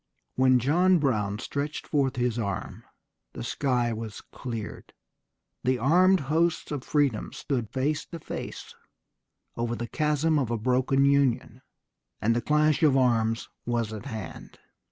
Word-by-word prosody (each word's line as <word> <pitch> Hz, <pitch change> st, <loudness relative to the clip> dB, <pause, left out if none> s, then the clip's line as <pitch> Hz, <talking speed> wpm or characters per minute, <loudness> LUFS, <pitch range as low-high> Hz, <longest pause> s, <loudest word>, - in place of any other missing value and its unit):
When 130 Hz, 0 st, +5 dB
John 175 Hz, +9 st, +4 dB
Brown 105 Hz, -9 st, 0 dB
stretched 140 Hz, +5 st, -4 dB
forth 140 Hz, -3 st, +1 dB
his 120 Hz, -1 st, 0 dB
arm 100 Hz, -4 st, -4 dB, 0.5 s
the -, -, -6 dB
sky 125 Hz, -, 0 dB
was 110 Hz, -1 st, -6 dB
cleared, 115 Hz, -4 st, -7 dB, 0.7 s
the 130 Hz, +1 st, +2 dB
armed 180 Hz, +9 st, +4 dB
hosts 160 Hz, +5 st, 0 dB
of 145 Hz, -4 st, -3 dB
freedom 140 Hz, -7 st, 0 dB
stood 125 Hz, -7 st, -3 dB
face 145 Hz, +3 st, -1 dB
to 170 Hz, -, -7 dB
face -, -, -7 dB, 0.8 s
over 120 Hz, 0 st, -2 dB
the 120 Hz, -, -4 dB
chasm 150 Hz, +3 st, +1 dB
of 130 Hz, -5 st, -1 dB
a 120 Hz, -, 0 dB
broken 130 Hz, +4 st, +2 dB
Union, 135 Hz, -4 st, +2 dB, 0.6 s
and 115 Hz, +2 st, +2 dB
the 120 Hz, -, +1 dB
clash 150 Hz, +2 st, +2 dB
of 145 Hz, -4 st, +5 dB
arms 115 Hz, -3 st, +2 dB, 0.2 s
was 115 Hz, -2 st, -1 dB
at 110 Hz, +4 st, -7 dB
hand." 110 Hz, -9 st, -8 dB
130 Hz, 140 wpm, -27 LUFS, 115-150 Hz, 0.8 s, When